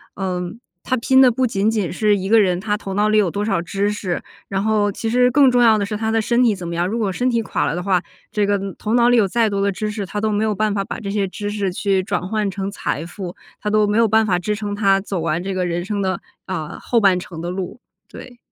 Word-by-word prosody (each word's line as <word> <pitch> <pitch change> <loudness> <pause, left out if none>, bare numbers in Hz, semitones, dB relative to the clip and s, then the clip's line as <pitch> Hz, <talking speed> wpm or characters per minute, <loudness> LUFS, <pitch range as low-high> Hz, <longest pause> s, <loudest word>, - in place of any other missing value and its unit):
嗯， 180 +1 -4 0.2
他 255 - 0
拼 265 +3 +4
的 255 -2 +7
不 255 +2 +1
仅 210 -3 +1
仅 210 -6 -1
是 210 +1 +2
一 190 - -4
个 225 +2 +5
人 180 -2 +1
他 210 +2 -1
头 195 -2 -6
脑 210 +1 +2
里 215 0 +3
有 195 -4 +2
多 205 +4 -2
少 195 -6 0
知 200 +4 -1
识， 190 -4 -3 0.3
然 195 0 -1
后 210 -1 +2
其 225 - -5
实 250 +2 +4
更 270 0 +5
重 245 0 +3
要 225 -2 +6
的 200 - 0
是 210 - -4
他 220 +1 -2
的 225 0 +2
身 235 +3 +1
体 220 -4 +3
怎 175 -2 -7
么 170 - -4
样。 175 +1 0
如 225 +4 -2
果 205 -4 0
身 250 +7 0
体 235 - +1
垮 - - -1
了 - - -1
的 175 - -3
话， 185 -2 +2 0.3
这 210 -1 +1
个 205 -1 +1 0.2
头 220 +2 -1
脑 240 -1 +5
里 245 - +4
有 210 - +4
再 230 +3 +2
多 200 -1 -1
的 200 - +2
知 210 +2 -3
识， 205 -1 -4
他 205 - -4
都 215 0 0
没 210 +1 0
有 215 -2 0
办 215 0 0
法 195 - -1
把 - - -6
这 200 -3 -5
些 200 -1 0
知 205 +2 -5
识 205 -3 -1
去 195 +1 0
转 180 -2 -2
换 210 0 -1
成 195 +1 -4
财 165 -5 -3
富， 180 0 -7 0.3
他 210 - -2
都 215 0 +3
没 205 +2 0
有 230 - +5
办 220 +1 +3
法 180 -4 +1
支 210 +4 -2
撑 205 -1 -4
他 195 -2 +3
走 195 -2 -4
完 165 +1 -1
这 195 - -3
个 185 -1 -1
人 175 +1 -2
生 205 0 -2
的， 190 -1 -1 0.3
啊， 160 -5 -5
后 235 - +1
半 195 -3 +4
程 175 -2 -9
的 175 - -3
路。 190 +5 -5 0.3
对。 245 -1 -11
205 Hz, 310 characters per minute, -20 LUFS, 190-220 Hz, 0.3 s, 的